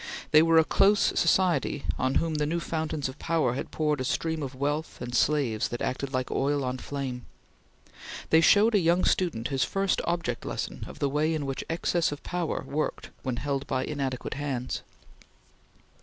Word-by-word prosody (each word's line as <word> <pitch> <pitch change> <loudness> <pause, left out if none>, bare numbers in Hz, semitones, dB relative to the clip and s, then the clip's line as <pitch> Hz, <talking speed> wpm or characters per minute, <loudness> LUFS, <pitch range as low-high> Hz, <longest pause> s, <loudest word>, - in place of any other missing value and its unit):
They 155 - +8
were 165 0 +4
a 160 - +7
close 200 +5 +4
society 170 -5 +2
on 130 0 +1
whom 165 -1 +1
the 150 -1 0
new 170 +3 0
fountains 160 -3 -2
of 130 +2 -9
power 160 -7 +1
had 130 - -4
poured 150 -3 0
a - - 0
stream 160 +4 -1
of 135 -2 -5
wealth 145 +4 -2
and 120 0 -6
slaves 130 -5 +2
that 120 - -5
acted 135 +1 -2
like 130 -1 -2
oil 140 +1 +1
on 125 0 -2
flame. 130 -4 -5 1.0
They 160 - +6
showed 210 +7 +5
a 205 - +5
young 175 +1 +3
student 145 -11 0
his 135 -2 +1
first 195 0 0
object 170 -9 -2
lesson - - -4
of - - -10
the 140 - 0
way 150 +3 +1
in 150 -2 -2
which 135 -1 -3
excess 165 0 +1
of 145 - -7
power 175 -2 -2
worked 150 +3 -3
when 130 -2 -2
held 140 +1 -2
by 130 0 -1
inadequate 135 -4 -3
hands. 135 -3 -3
145 Hz, 185 wpm, -27 LUFS, 130-165 Hz, 1.0 s, They